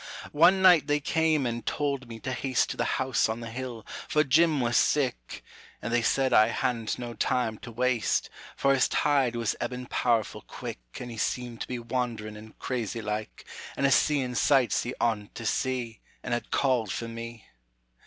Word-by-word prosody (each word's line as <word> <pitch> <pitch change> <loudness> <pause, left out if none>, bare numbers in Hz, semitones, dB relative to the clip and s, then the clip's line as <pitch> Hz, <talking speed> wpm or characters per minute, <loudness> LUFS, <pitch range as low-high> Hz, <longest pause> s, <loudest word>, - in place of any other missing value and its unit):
One 175 +5 +5
night 175 -6 +7
they 145 0 +2
came 155 -1 +1
and 120 -1 -2
told 140 -3 -2
me 115 -1 -8
to 130 - -3
haste 130 -1 0
To - - -6
the - - +1
house 130 -3 +1
on 110 +1 -2
the 115 -1 -7
hill, 120 -2 -6 0.2
for 150 - +3
Jim 155 +2 +3
was 120 -1 0
sick, 135 -5 +1 0.4
And 115 - -4
they 120 - +3
said 130 +2 +1
I 110 - +7
hadn't 115 -1 -1
no 120 -1 -6
time 115 -1 0
to 120 - -9
waste, 120 -1 +1 0.3
For 140 - +3
his 130 -3 +3
tide 135 -5 +2
was 115 -2 -1
ebbin' 125 +1 -4
powerful 115 -3 0
quick - - -7 0.2
An' 125 - -6
he 115 - -8
seemed 120 +1 -2
to - - -3
be 125 - -3
wand'rin' 115 -3 -3
and 110 +1 -13
crazy 115 -3 -3
like, 105 0 -4 0.3
An' 140 - +1
a 135 - +4
seein' 135 -2 +2
sights 130 0 +3
he 120 - -4
oughtn't 105 -3 -1
to 115 - -6
see, 125 -2 -1 0.2
An' - - -5
had 120 0 -2
called 125 -7 +1
for 115 - -3
me. 115 -1 -8
125 Hz, 190 wpm, -28 LUFS, 115-135 Hz, 0.4 s, night